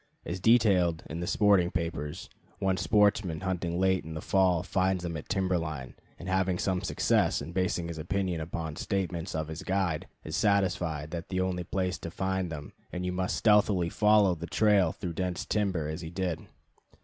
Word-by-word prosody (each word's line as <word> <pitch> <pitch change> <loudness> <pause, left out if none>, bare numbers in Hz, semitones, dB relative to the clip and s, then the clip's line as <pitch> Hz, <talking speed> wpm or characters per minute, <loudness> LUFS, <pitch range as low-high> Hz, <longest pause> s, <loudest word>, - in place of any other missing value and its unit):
As 90 +2 -4
detailed 95 -7 +4
in 80 - -4
the 85 - -3
sporting 100 -4 +4
papers, 85 -2 -4 0.3
one 95 -1 +1
sportsman 100 -5 +2
hunting 90 -2 -2
late 95 -1 +2
in 80 0 -7
the - - -3
fall 90 -3 +3
finds 95 -1 0
them 85 -1 -3
at 80 - -6
the - - -1
timber 95 -2 +1
line, 75 -6 -5 0.2
and 85 - -9
having 95 -1 +1
some 90 -1 0
success - - +1
and 75 +4 -7
basing 90 -2 0
his 85 -1 -6
opinion 90 0 -1
upon 80 -1 -5
statements 95 -3 -2
of 80 -1 -2
his 80 +1 -6
guide, 95 -5 -1 0.2
is - - -4
satisfied 90 -7 +1
that 85 0 -4
is - - -41
the 95 -1 0
only 90 -1 -1
place 90 -2 -2
to 85 - -6
find 95 0 -2
them, 75 -2 -7 0.2
and 90 - -4
that - - -2
you 90 - -1
must 90 0 -1
stealthily 105 -5 +3
follow 105 -1 +4
the 85 0 -6
trail 100 -6 +3
through 90 -2 -5
dense 90 0 -2
timber, 95 -7 0
as 80 +3 -4
he 80 - -6
did. 90 -1 -3
90 Hz, 195 wpm, -29 LUFS, 85-95 Hz, 0.3 s, detailed